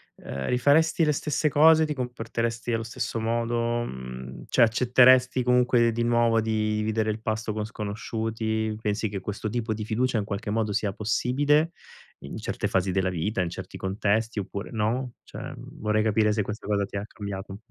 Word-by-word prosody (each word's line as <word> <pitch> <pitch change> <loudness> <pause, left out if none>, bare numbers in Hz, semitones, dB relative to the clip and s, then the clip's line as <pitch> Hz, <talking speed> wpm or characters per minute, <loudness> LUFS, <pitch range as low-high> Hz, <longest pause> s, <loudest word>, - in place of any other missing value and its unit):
ehm, 65 -1 -6
rifaresti 155 +6 +3
le 150 - +3
stesse 150 +1 0
cose, 160 +2 +6
ti 150 - -2
comporteresti 115 -2 -3
allo 115 0 0
stesso 115 0 -3
modo, 115 +1 0
mhmm, 65 - -7
cioè - - +2
accetteresti 125 +2 +5
comunque 125 -1 +3
di 115 +1 -1
nuovo 115 -1 +3
di 110 -1 0
dividere 110 0 0
il 110 - -5
pasto 110 0 -2
con 105 0 -3
sconosciuti? 110 0 -3
Pensi 105 0 -1
che 100 -1 -4
questo 105 +3 -4
tipo 110 0 -2
di 110 0 -5
fiducia 115 +2 0
in - - -1
qualche 105 +1 -4
modo 110 -1 0
sia 100 -1 -1
possibile 145 - +1 0.5
in - - -8
certe - - -3
fasi 95 0 +1
della 95 -1 +1
vita, 95 +4 -1
in 90 - -1
certi - - -8
contesti 105 +4 0
oppure 100 +1 -5
no? 120 +3 -1
Cioè, - - -11 0.2
mhmm, - - -12
vorrei 105 0 +2
capire 110 0 +2
se 105 0 +1
questa 105 +2 -6
cosa 100 -1 +1
ti 100 - -11
ha 100 - -2
cambiato. 100 -2 -7
110 Hz, 180 wpm, -26 LUFS, 105-120 Hz, 0.5 s, cose